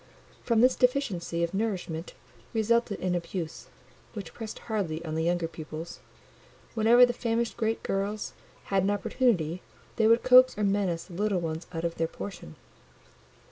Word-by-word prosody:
From 230 -2 +3
this 255 +1 +5
deficiency 210 -10 0
of 170 - -2
nourishment 190 -5 -3 0.4
resulted 225 -1 +1
an 185 -1 0
abuse, 170 -1 -4 0.5
which 195 -7 -7
pressed 225 -2 -7
hardly 175 -7 -2
on 155 - -4
the 160 0 0
younger 175 -1 +1
pupils: 160 0 -8 0.7
whenever 235 +2 +6
the 245 - -2
famished 235 -1 -1
great 225 -1 -1
girls 200 +2 -2 0.4
had 195 - +4
an 195 - +1
opportunity, 195 - +1 0.4
they 220 - +4
would 230 +1 +5
coax 255 -2 +7
or 210 - -1
menace 195 -4 +1
the 180 - -14
little 200 +1 0
ones 165 0 -4
out 165 -2 -4
of 170 - -2
their 165 - +1
portion. 160 - -8
195 Hz, 155 wpm, -28 LUFS, 170-225 Hz, 0.7 s, coax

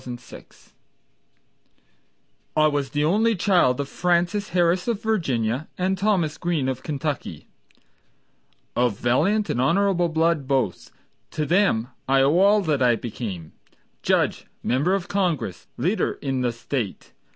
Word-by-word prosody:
Hamilton 125 -1 -8
Greene - - -31 2.1
I 155 - +5
was 145 -3 0
the 145 +1 -1
only 220 +7 +2
child 175 -9 +2
of 140 - -2
Frances 180 +5 0
Harris 175 +2 +1
of 230 -4 0
Virginia 135 - -1
And 185 +1 0
Thomas 190 -6 0
Greene 170 -6 -1
of 130 -1 -3
Kentucky, 150 -1 -4 1.3
Of 120 -4 +1
valiant 180 - +1
and 120 - 0
honorable 175 +3 +2
blood 160 -3 +1
both. 130 -9 -1 0.4
To 155 -1 -2
them 165 - +2 0.2
I 135 0 +4
owe 145 +6 +3
all 205 +2 +5
that 155 -7 0
I 120 -2 +4
became, 105 -8 -6 0.5
Judge, - - 0 0.2
member 145 +10 +1
of 190 -3 -3
Congress, 155 - -2
leader 180 - 0
in 135 -2 -3
the 125 -1 +1
State. 115 -2 -5
155 Hz, 135 wpm, -23 LUFS, 125-185 Hz, 2.1 s, I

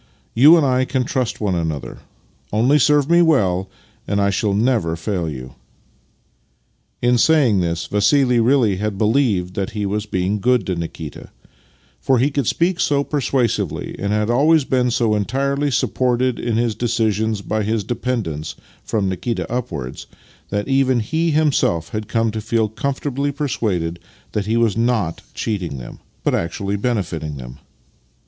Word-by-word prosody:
You 150 +8 +7
and 155 - +3
I 130 -1 +2
can 130 0 -1
trust 125 -1 -2
one 105 -3 0
another. 80 -4 -3 0.5
Only 125 +8 +3
serve 145 +1 +3
me 170 +1 +5
well, 95 - +2 0.4
and 100 0 0
I 100 0 +2
shall 100 +1 0
never 110 -7 +1
fail 85 0 -2
you." 65 -3 -8 1.5
In 120 0 +3
saying 135 -9 +4
this, 85 -2 -1
Vassili 125 +4 +3
really 115 -5 +3
had 105 0 -2
believed 105 -5 +1
that 100 +4 -3
he 105 - -1
was 105 +2 -2
being 95 +1 -1
good 125 -1 +2
to 95 - -1
Nikita, 80 -2 -7 0.7
for 130 - +2
he 135 +5 +2
could 140 -5 -1
speak 175 +1 +1
so 140 -2 +2
persuasively 125 - -1
and 100 0 -2
had 105 +2 +1
always 150 +5 +4
been 125 -2 +1
so 115 -2 +1
entirely 140 +7 0
supported 125 -1 0
in 115 -2 -1
his 115 -1 +1
de 120 +3 -2
cisions 110 -2 0
by 110 0 0
his 110 0 -1
dependents, 110 -10 -3 0.3
from 105 -3 -1
Nikita 95 +1 -2
upwards, 80 - -4 0.4
that 105 0 -2
even 135 -2 +2
he 160 +9 0
himself 145 - +1
had 110 -1 -4
come 115 -1 0
to 110 0 -4
feel 110 0 0
comfortably 140 +3 -2
per 145 +1 -3
suaded 90 -9 -1 0.3
that 105 -1 -2
he 115 +2 +1
was 115 -4 +2
not 115 -8 0
cheating 90 -10 -3
them, - - -9 0.2
but - - +1
actually 100 +4 -2
benefiting 90 - -2
them. 60 -1 -10
110 Hz, 160 wpm, -20 LUFS, 95-130 Hz, 1.5 s, You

